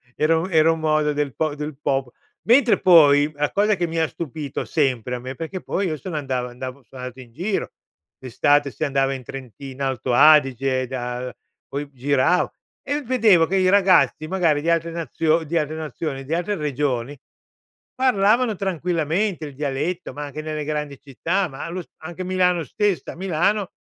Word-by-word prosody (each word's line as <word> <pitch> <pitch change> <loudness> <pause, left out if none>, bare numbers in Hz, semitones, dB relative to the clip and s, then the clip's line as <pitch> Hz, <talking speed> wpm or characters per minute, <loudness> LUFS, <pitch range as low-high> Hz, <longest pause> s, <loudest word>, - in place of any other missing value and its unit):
era 160 +1 +2
un 185 +3 -4
era 160 0 +5
un 165 - -2
modo 155 -1 +1
del 145 -4 -2
pop 155 -2 -1
del 150 -1 -6
popol 135 -4 -1 0.4
mentre 245 0 +5
poi, 150 -4 +6
la 150 0 -1
cosa 210 +1 +2
che 175 -1 -1
mi 165 0 -2
ha 160 - +2
stupito 150 -3 -5
sempre 125 -5 0
a - - -5
me, 130 +2 -7
perché 165 +5 -6
poi 195 -1 -2
io 155 -2 -2
sono 160 +3 -7
andav 130 -3 -2
andavo 130 +2 -8
sono 125 +3 -12
andato 125 0 -7
in 120 -3 -13
giro, 190 - -2 0.5
d’estate, 140 +3 +1
si 155 - -3
andava 135 -1 +1
in 130 -1 -7
Trentino-Alto 130 +1 -5
Adige 135 -3 +4
da 125 0 -4 0.3
poi 145 +1 -5
gira 140 +6 +1 0.3
e 290 +1 -2
vedevo 225 -9 +4
che 195 - 0
i 185 -1 +3
ragazzi 185 -5 +4
magari 165 -5 +1
di 165 - -1
altre 165 0 +1
nazio 165 -1 0
di 165 +2 -2
altre 155 0 -1
nazioni, 155 -3 -5
di 150 - -4
altre 180 +5 -1
regioni, 140 -4 -2 0.8
parlavano 235 -2 +3
tranquillamente 175 -1 -1
il 145 - -8
dialetto, 145 +5 -3
ma 150 - -6
anche 145 +2 -6
nelle 155 -1 -4
grandi 150 -2 -3
città, 170 +8 -1
ma 135 - -7
allo 175 +2 -4
s - - -17
anche 175 +3 -7
Milano 180 -2 +1
stessa, 205 - -1
a - - -14
Milano 190 +2 0
155 Hz, 180 wpm, -22 LUFS, 135-175 Hz, 0.8 s, poi